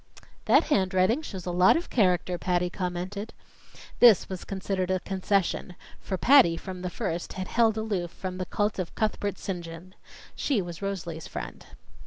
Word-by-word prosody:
"That -, -, +5 dB
handwriting 190 Hz, +1 st, +2 dB
shows 190 Hz, -, -7 dB
a 180 Hz, -, -2 dB
lot 180 Hz, -, +5 dB
of 345 Hz, -, -6 dB
character," 180 Hz, -4 st, +2 dB
Patty 180 Hz, -1 st, 0 dB
commented. 185 Hz, +4 st, -4 dB, 0.7 s
This 235 Hz, -5 st, +7 dB
was 185 Hz, -2 st, -5 dB
considered 190 Hz, -1 st, -3 dB
a 185 Hz, 0 st, +1 dB
concession; 190 Hz, -1 st, -1 dB, 0.2 s
for 190 Hz, -, -4 dB
Patty, 235 Hz, -9 st, +6 dB
from 185 Hz, +1 st, -7 dB
the 180 Hz, -, -3 dB
first, 175 Hz, -4 st, -4 dB
had 185 Hz, 0 st, -5 dB
held 225 Hz, -2 st, +2 dB
aloof 205 Hz, -6 st, -2 dB
from 185 Hz, +1 st, -6 dB
the 185 Hz, -, -3 dB
cult 205 Hz, -1 st, -1 dB
of 180 Hz, -, -4 dB
Cuthbert 205 Hz, -3 st, -1 dB
St. 190 Hz, -4 st, -4 dB
John. 165 Hz, +2 st, -10 dB, 0.4 s
She 275 Hz, -7 st, 0 dB
was 175 Hz, -2 st, -6 dB
Rosalie's 170 Hz, -5 st, -4 dB
friend. -, -, -7 dB
185 Hz, 165 wpm, -27 LUFS, 180-205 Hz, 0.7 s, This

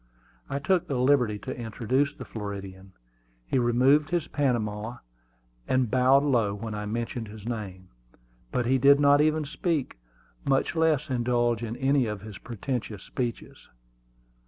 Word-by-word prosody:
I 140 Hz, -, -2 dB
took 165 Hz, +5 st, +1 dB
the 135 Hz, -, -1 dB
liberty 125 Hz, -4 st, +3 dB
to 130 Hz, +5 st, -6 dB
introduce 125 Hz, +5 st, -1 dB
the -, -, -8 dB
Floridian. 100 Hz, -3 st, -7 dB, 0.5 s
He 130 Hz, -, +1 dB
removed 130 Hz, +5 st, +3 dB
his 175 Hz, -2 st, -1 dB
Panama, 115 Hz, -4 st, -1 dB, 0.7 s
and 130 Hz, -4 st, +1 dB
bowed 130 Hz, +2 st, +5 dB
low 115 Hz, -8 st, +1 dB
when 110 Hz, +1 st, -6 dB
I 105 Hz, 0 st, -4 dB
mentioned 115 Hz, +1 st, -3 dB
his 105 Hz, 0 st, -11 dB
name; 95 Hz, -6 st, -6 dB, 0.6 s
but 125 Hz, -, 0 dB
he 130 Hz, +2 st, +2 dB
did 140 Hz, +2 st, +6 dB
not 145 Hz, 0 st, +5 dB
even 155 Hz, 0 st, +2 dB
speak, 150 Hz, -, -2 dB, 0.4 s
much 135 Hz, +4 st, +1 dB
less 155 Hz, -3 st, +1 dB
indulge 120 Hz, -2 st, +1 dB
in 115 Hz, 0 st, -4 dB
any 135 Hz, -1 st, +2 dB
of 105 Hz, -2 st, -4 dB
his 105 Hz, -1 st, -9 dB
pretentious 115 Hz, -3 st, -5 dB
speeches. 120 Hz, -2 st, -5 dB
125 Hz, 145 wpm, -27 LUFS, 110-140 Hz, 0.7 s, did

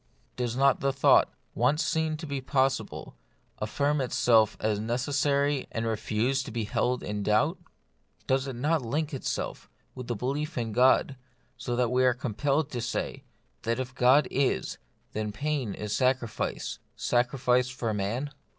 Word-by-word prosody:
Does 120 Hz, -2 st, -2 dB
not 140 Hz, 0 st, +4 dB
the 140 Hz, -, +1 dB
thought, 135 Hz, 0 st, +4 dB, 0.2 s
once 150 Hz, +3 st, +2 dB
seen 160 Hz, -1 st, 0 dB
to 160 Hz, -, -7 dB
be 140 Hz, -2 st, -3 dB
possible, 135 Hz, 0 st, -1 dB, 0.4 s
affirm 140 Hz, +7 st, 0 dB
itself 115 Hz, -4 st, +3 dB
as 105 Hz, -1 st, 0 dB
necessary, 140 Hz, +4 st, 0 dB
and 115 Hz, 0 st, -2 dB
refuse 115 Hz, +4 st, 0 dB
to 130 Hz, -, -7 dB
be 115 Hz, -1 st, -2 dB
held 125 Hz, +4 st, 0 dB
in 105 Hz, 0 st, -3 dB
doubt? 105 Hz, +1 st, +2 dB, 0.7 s
Does 130 Hz, 0 st, +1 dB
it 135 Hz, -, -4 dB
not 150 Hz, +5 st, +1 dB
link 145 Hz, +6 st, -2 dB
itself 135 Hz, -, -4 dB, 0.2 s
with 125 Hz, -2 st, -8 dB
the 120 Hz, -, -2 dB
belief 140 Hz, +7 st, -3 dB
in 115 Hz, -2 st, -2 dB
God, 130 Hz, +3 st, +3 dB, 0.4 s
so 120 Hz, 0 st, -3 dB
that 125 Hz, -1 st, +1 dB
we 130 Hz, +1 st, +3 dB
are 125 Hz, -2 st, +4 dB
compelled 140 Hz, +5 st, -1 dB
to 120 Hz, -, -3 dB
say, -, -, -3 dB, 0.4 s
that 115 Hz, +2 st, -1 dB
if 130 Hz, 0 st, -4 dB
God 130 Hz, +3 st, +5 dB
is, 130 Hz, -, 0 dB, 0.3 s
then 105 Hz, -1 st, -3 dB
pain 135 Hz, -1 st, -2 dB
is 105 Hz, -1 st, -3 dB
sacrifice 130 Hz, -3 st, -1 dB
— -, -, -43 dB
sacrifice 125 Hz, 0 st, +1 dB
for 120 Hz, -3 st, -3 dB
man 110 Hz, +8 st, -2 dB
125 Hz, 160 wpm, -28 LUFS, 115-140 Hz, 0.7 s, God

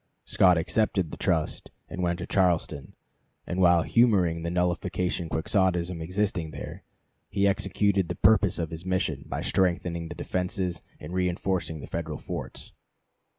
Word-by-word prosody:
Scott 90 Hz, -2 st, +4 dB
accepted 90 Hz, -1 st, +1 dB
the -, -, -5 dB
trust 80 Hz, -3 st, -1 dB, 0.2 s
and 90 Hz, -, -5 dB
went 85 Hz, -1 st, 0 dB
to 85 Hz, -, -5 dB
Charleston, 85 Hz, -6 st, 0 dB, 0.5 s
and 90 Hz, +1 st, -2 dB
while 85 Hz, -2 st, +5 dB
humoring 95 Hz, -9 st, +3 dB
the 85 Hz, -, -2 dB
nullification 90 Hz, 0 st, -1 dB
Quixotism 90 Hz, +1 st, 0 dB
existing 90 Hz, -1 st, -1 dB
there, -, -, -8 dB, 0.5 s
he 100 Hz, 0 st, +2 dB
executed 100 Hz, -1 st, +1 dB
the -, -, -2 dB
purpose 105 Hz, -4 st, +4 dB
of 80 Hz, -2 st, -3 dB
his 80 Hz, +1 st, -6 dB
mission, 95 Hz, 0 st, -1 dB
by -, -, -3 dB
strengthening 85 Hz, -2 st, 0 dB
the -, -, -7 dB
defenses 90 Hz, -1 st, -2 dB, 0.2 s
and 85 Hz, -, -8 dB
reenforcing; 90 Hz, -3 st, -1 dB
the -, -, -7 dB
Federal 80 Hz, -3 st, -4 dB
forts. -, -, -7 dB
90 Hz, 145 wpm, -27 LUFS, 85-95 Hz, 0.5 s, while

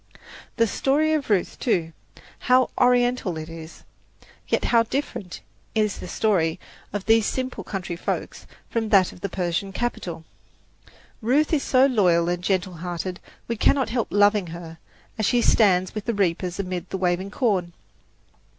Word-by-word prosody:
The 230 Hz, -, +4 dB
story 290 Hz, +7 st, +1 dB
of 300 Hz, -5 st, -1 dB
Ruth, 195 Hz, -4 st, 0 dB
too 165 Hz, -9 st, 0 dB, 0.5 s
how 255 Hz, 0 st, +3 dB
Oriental 245 Hz, -7 st, +2 dB
it 155 Hz, 0 st, -6 dB
is! 165 Hz, 0 st, -10 dB, 0.6 s
Yet -, -, 0 dB
how 235 Hz, -1 st, +4 dB
different 230 Hz, -6 st, -4 dB, 0.3 s
is 215 Hz, -2 st, +1 dB
the -, -, -7 dB, 0.2 s
life 165 Hz, -5 st, +2 dB, 0.3 s
of 205 Hz, -1 st, -4 dB
these 225 Hz, -1 st, +4 dB
simple 260 Hz, -1 st, -3 dB
country 185 Hz, -3 st, -4 dB
folks 170 Hz, -, -4 dB, 0.2 s
from 225 Hz, -2 st, -2 dB
that 195 Hz, -4 st, +4 dB
of 180 Hz, -, -15 dB
the 200 Hz, -, -3 dB
Persian 180 Hz, +2 st, -2 dB
capital! 180 Hz, -8 st, -4 dB, 1.0 s
Ruth 280 Hz, +8 st, +2 dB
is 300 Hz, -, +3 dB
so 260 Hz, 0 st, +4 dB
loyal 180 Hz, -10 st, +3 dB
and 175 Hz, 0 st, -2 dB
gentle 185 Hz, -2 st, -1 dB
hearted, 175 Hz, +1 st, -4 dB, 0.3 s
we 235 Hz, -, -1 dB
cannot 265 Hz, +4 st, +2 dB
help 235 Hz, -1 st, -1 dB
loving 205 Hz, -2 st, +3 dB
her, 165 Hz, -1 st, -9 dB, 0.4 s
as 215 Hz, -, +2 dB
she 245 Hz, -, +3 dB
stands 185 Hz, -4 st, +3 dB
with 215 Hz, -1 st, -5 dB
the 235 Hz, -, -1 dB
reapers 180 Hz, -1 st, -1 dB
amid 185 Hz, -2 st, -4 dB
the -, -, -3 dB
waving 180 Hz, +1 st, 0 dB
corn. 195 Hz, -7 st, 0 dB
200 Hz, 155 wpm, -24 LUFS, 175-235 Hz, 1.0 s, The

